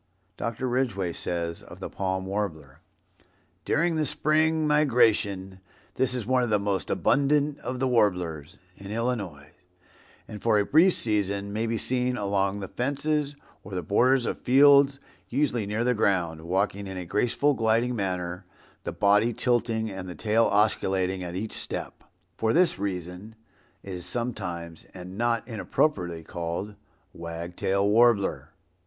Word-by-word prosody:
Dr. 115 +3 -3
Ridgway 115 -9 -1
says 85 -1 -3
of - - -13
the - - -5
Palm 95 -1 -3
Warbler, 85 -9 -4 0.9
"During 165 0 +1
the 155 - +1
spring 155 +1 +2
migration 110 -10 +2 0.3
this 130 -1 +1
is 120 -4 -3
one 130 +2 +2
of 120 - 0
the 105 - +3
most 100 -1 -2
abundant 145 +1 +2
of 125 0 -5
the 130 - +1
warblers," 90 - 0 0.2
in 100 0 -11
Illinois, 105 -10 -3 0.8
"and 105 - -8
for 115 -2 +3
a 100 - +2
brief 170 - +5
season 100 -2 -1
may 110 +2 -1
be 115 0 -1
seen 125 +1 0
along 100 -1 0
the 95 - -5
fences, 145 +4 -1 0.3
or 100 - -8
the 90 - -2
borders 125 +8 +3
of - - -3
fields, 140 +1 +6 0.3
usually 125 -5 0
near 105 +3 -1
the 125 +1 +2
ground, 90 -7 0
walking 95 +3 -1
in 95 -1 -6
a 90 - -5
graceful, 120 +10 +1
gliding 115 +1 +1
manner, 90 -3 -3 0.3
the - - -4
body 105 +3 +3
tilting 115 -2 0
and 95 -1 -6
the 90 - -7
tail 115 +1 +2
oscillating 95 -3 +1
at 90 -1 -5
each 105 +4 -4
step. - - -5 0.3
For 110 0 +1
this 180 - +3
reason 95 +2 -5 0.5
it 95 - -7
is 90 -1 -6
sometimes, 90 -9 -4
and 90 0 -9
not 115 +1 0
inappropriately 95 - -1
called 85 +5 -4 0.4
Wag 85 +1 -7
Tail 100 +2 +1
Warbler." 110 -1 +3
105 Hz, 150 wpm, -26 LUFS, 95-125 Hz, 0.9 s, fields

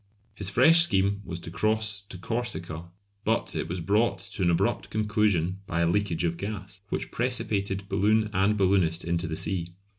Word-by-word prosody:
His 100 -2 -1
fresh 160 +11 +7
scheme 100 - +2
was 85 -2 -5
to 80 - -6
cross 110 +1 0
to 100 -2 -10
Corsica, 90 -6 -2 0.4
but 110 +1 0
it - - -2
was 90 +1 -3
brought 105 +7 +2 0.2
to 100 - -5
an 90 - +3
abrupt 85 - 0
conclusion 105 -4 0
by 85 - -1
a 85 - +3
leakage 90 -2 0
of 85 -1 -1
gas, 95 0 -6
which - - -3
precipitated 100 -5 -1
balloon 105 +3 +2
and 100 +2 +2
balloonist 95 -4 +2
into 85 0 -1
the 80 -1 -4
sea. 85 -3 -3
100 Hz, 175 wpm, -27 LUFS, 85-105 Hz, 0.4 s, fresh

